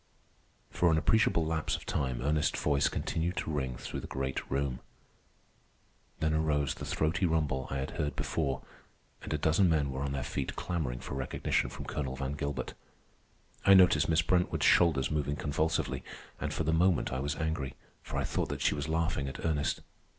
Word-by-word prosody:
For 85 - +3
an 80 - +4
appreciable 85 +1 +3
lapse 80 0 0
of - - -8
time 65 -3 -1
Ernest's 75 +2 +1
voice 70 -2 +2
continued 85 +3 -2
to - - -2
ring 65 -4 -2
through - - -5
the - - -7
great 65 0 -3
room. 70 -2 -1 1.4
Then 80 0 +1
arose 75 -3 +1
the - - -7
throaty 85 +4 +1
rumble 75 -5 0
I 70 - -2
had 65 - -3
heard 75 -1 -2
before, 70 -5 -1 0.6
and - - -7
a 75 - +1
dozen 80 +5 +3
men 75 -4 +2
were 65 +1 -4
on 70 0 -1
their 70 -1 -2
feet 65 +1 -3
clamoring 75 -9 -2
for - - -6
recognition 65 -1 0
from - - -7
Colonel 65 -3 -3
Van 70 0 -3
Gilbert. 70 -3 -3 0.9
I 100 - +8
noticed 90 -6 +6
Miss 80 0 +3
Brentwood's 90 +1 +2
shoulders 80 -6 +4
moving 75 -1 0
convulsively, 75 +3 -1 0.4
and - - -2
for - - -1
the 80 +1 +1
moment 85 -3 +3
I 65 - -1
was 70 +3 -1
angry, 80 -4 -2 0.3
for - - -6
I - - +1
thought - - -1
that - - -4
she - - +3
was 75 0 -3
laughing 80 -4 0
at 65 - -6
Ernest. 75 -3 0
75 Hz, 185 wpm, -31 LUFS, 70-80 Hz, 1.4 s, I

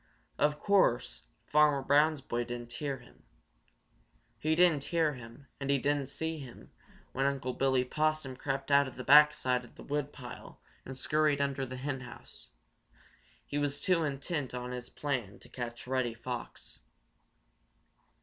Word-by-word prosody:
Of 150 0 +3
course, 120 - +2 0.2
Farmer 150 -2 +4
Brown's 150 +2 +4
boy 120 -2 -2
didn't 120 0 -6
hear 140 +2 -3
him. - - -19 1.2
He 155 +5 +1
didn't 165 -5 +4
hear 165 -3 +1
him 125 +2 -11
and 135 0 -4
he 140 - +4
didn't 140 0 0
see 160 +2 -3
him 130 -4 -11 0.4
when 135 +1 +1
Unc' 135 -2 -2
Billy 130 -2 +3
Possum 155 -1 0
crept 135 +1 -3
out 140 0 +6
of 130 - -9
the 130 - -6
back 150 +3 +8
side 125 -1 -1
of 120 - -16
the - - -11
woodpile 140 -4 -5 0.3
and 130 0 -7
scurried 150 +1 +2
under 140 -1 -1
the 130 +1 -6
henhouse. 130 -2 -6 1.0
He 145 - -2
was 145 0 -1
too 180 -3 +2
intent 140 -1 -3
on 125 0 -4
his 125 -1 -6
plan 125 -9 -3
to - - -16
catch 120 -1 -6
Reddy 125 -2 -1
Fox. 120 +1 -7
135 Hz, 150 wpm, -31 LUFS, 125-150 Hz, 1.2 s, back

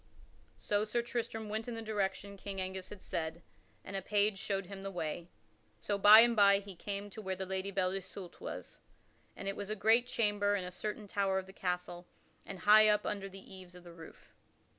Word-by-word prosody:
So 205 0 0
Sir 235 +2 -1
Tristram 225 -2 -4
went 220 +2 -3
in 240 - -4
the 225 - -5
direction 200 -2 -2
King 195 0 -6
Angus 185 0 -4
had 205 -2 -11
said, 165 -1 -4 0.4
and 195 - -7
a 195 - -1
page 205 -1 +1
showed 195 -1 -2
him 195 +1 -9
the 195 - -4
way. 170 -1 -4 0.5
So 205 - -1
by 210 +2 +10
and 235 0 +4
by 200 -2 +6
he 200 -1 -8
came 200 +3 -5
to 220 - -8
where 190 -2 -3
the 190 +1 -5
Lady 190 +1 -3
Belle 185 -2 0
Isoult 190 -1 -7
was, - - -7 0.6
and 195 - -7
it 195 - -1
was 205 0 -5
a 215 - -1
great 225 +4 +3
chamber 205 -4 +1
in 195 - -2
a 180 - -6
certain 210 +3 -5
tower 195 -1 0
of 190 - -2
the 190 - -13
castle 180 -1 -4 0.4
and 195 - -6
high 215 +1 +7
up 210 0 +3
Under 195 -1 -3
the 195 0 -12
eaves 185 -1 -12
of 180 - -13
the 175 -1 -12
roof. 165 -1 -14
195 Hz, 215 wpm, -33 LUFS, 185-210 Hz, 0.6 s, by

